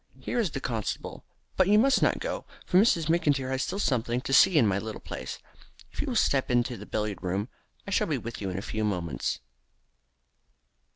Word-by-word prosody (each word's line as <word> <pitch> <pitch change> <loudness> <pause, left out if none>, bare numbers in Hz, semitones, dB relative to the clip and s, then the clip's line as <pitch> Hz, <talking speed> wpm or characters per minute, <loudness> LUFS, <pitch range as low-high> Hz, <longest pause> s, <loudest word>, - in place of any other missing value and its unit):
Here 245 - -2
is 215 -6 +1
the 140 - -4
constable, 115 -5 -4 0.3
but 185 - +3
you 205 +1 +5
must 265 +5 +4
not - - +3
go, - - -4 0.2
for 180 - +2
Miss 215 +5 +6
McIntyre 145 -5 +1
has 130 0 0
still 195 - -2
something 125 - 0
to 135 - -3
see 170 +4 +6
in 130 - +6
my 100 -1 +1
little 110 +1 -6
place. - - -6 0.5
If - - -4
you - - -3
will - - -2
step 135 -2 +2
into 120 0 +1
the 105 -1 -10
billiard 105 -2 -3
room 95 +5 -2 0.4
I 200 - -6
shall - - +2
be 150 -4 0
with 115 -2 -7
you 95 - -2
in 90 - -4
a - - -3
very - - -7
few 110 - -1
moments." 90 - -2
125 Hz, 215 wpm, -28 LUFS, 105-160 Hz, 0.5 s, Miss